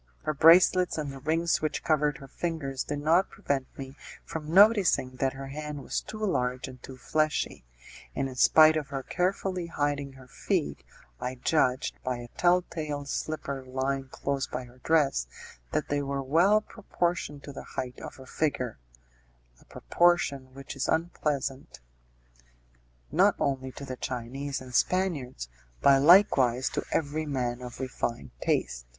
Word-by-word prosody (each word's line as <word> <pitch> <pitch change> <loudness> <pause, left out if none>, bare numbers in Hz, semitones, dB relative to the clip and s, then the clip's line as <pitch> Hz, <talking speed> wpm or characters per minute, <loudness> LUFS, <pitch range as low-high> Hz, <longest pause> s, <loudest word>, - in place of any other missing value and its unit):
Her 155 - -1
bracelets 175 +4 +6
and 150 -3 -3
the 135 - -9
rings 165 +4 +1
which 155 - -2
covered 150 -2 +1
her 135 - -11
fingers 140 -4 -3
did 145 0 -4
not 165 +5 +3
prevent 135 -2 -2
me 135 0 -8 0.3
from 155 -1 -6
noticing 190 - +5
that 135 +1 0
her 135 0 -8
hand 150 0 -6
was - - -2
too 215 - -9
large 125 -9 -1
and 125 -2 -11
too 130 0 -10
fleshy, 155 - -1 0.5
and 135 - -1
in 130 - -7
spite 155 +5 +6
of 150 -3 -2
her 135 -1 -5
carefully 185 0 -1
hiding 145 -3 -2
her 130 -1 -15
feet, - - -2 0.4
I 125 +1 -3
judged, 130 -1 0
by 130 -1 -2
a 120 0 -9
telltale 165 -4 0
slipper 140 -2 -4
lying 135 +1 -2
close 140 +1 -2
by 130 - -5
her 125 +1 -16
dress, 140 - +2 0.4
that - - -1
they 145 0 0
were 140 -1 -3
well 175 +10 +4
proportioned 175 -9 -3
to 140 - -8
the - - -7 0.2
height 125 -1 -4
of - - -8
her 130 - -13
figure 130 - -2 0.8
a - - -22
proportion 140 -7 +1
which 135 +1 -8
is 135 - -2
unpleasant 145 - -2 1.3
not - - +4
only 130 -1 -1
to 140 - -8
the 130 -1 -6
Chinese 130 +3 -4
and 130 -1 -11
Spaniards, 145 - 0 0.3
but 135 -1 +5
likewise 135 -7 +5
to - - -3
every 155 0 -1
man 125 -3 -2
of 125 -1 -8
refined 120 - -4
taste. - - -1
140 Hz, 155 wpm, -28 LUFS, 130-160 Hz, 1.3 s, bracelets